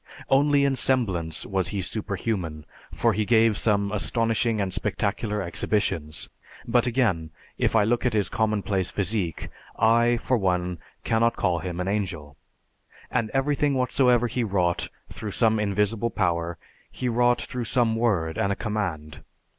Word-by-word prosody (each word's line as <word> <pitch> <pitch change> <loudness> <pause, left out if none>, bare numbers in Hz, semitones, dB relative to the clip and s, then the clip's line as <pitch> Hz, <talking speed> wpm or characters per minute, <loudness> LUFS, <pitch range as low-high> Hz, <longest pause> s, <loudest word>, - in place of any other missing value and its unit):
Only 140 +1 +4
in 140 -1 +1
semblance 95 - 0
was 95 -3 0
he 100 +2 -3
superhuman 95 -6 -3 0.3
for 115 -1 +1
he 105 +2 0
gave 115 0 +4
some 100 -2 +1
astonishing 115 +1 0
and 95 -2 -1
spectacular 105 +1 -1
exhibitions. 85 -3 -1 0.4
But 120 +1 +3
again, 110 -11 +1 0.3
if - - +1
I 110 - +5
look 115 +3 +1
at 125 - +1
his 105 -2 +2
commonplace 105 -4 0
physique, 95 -4 -1 0.3
I, 120 +2 +4
for 125 +2 0
one, 90 -3 -1 0.2
cannot 115 +1 +2
call 85 -2 0
him 85 +1 -5
an 90 - -2
angel. 90 -8 -3 0.8
And 110 - 0
everything 145 +1 +1
whatsoever 125 -1 +3
he 120 +1 -1
wrought 90 -5 0 0.2
through 105 -3 -6
some 110 -2 +3
invisible 105 +2 0
power, 85 -4 -1 0.3
he 125 - -4
wrought 120 0 +3
through 125 -2 -5
some 115 -1 +1
word 95 -9 0
and 100 - +1
a - - 0
command. 90 -10 -4
105 Hz, 145 wpm, -25 LUFS, 90-115 Hz, 0.8 s, I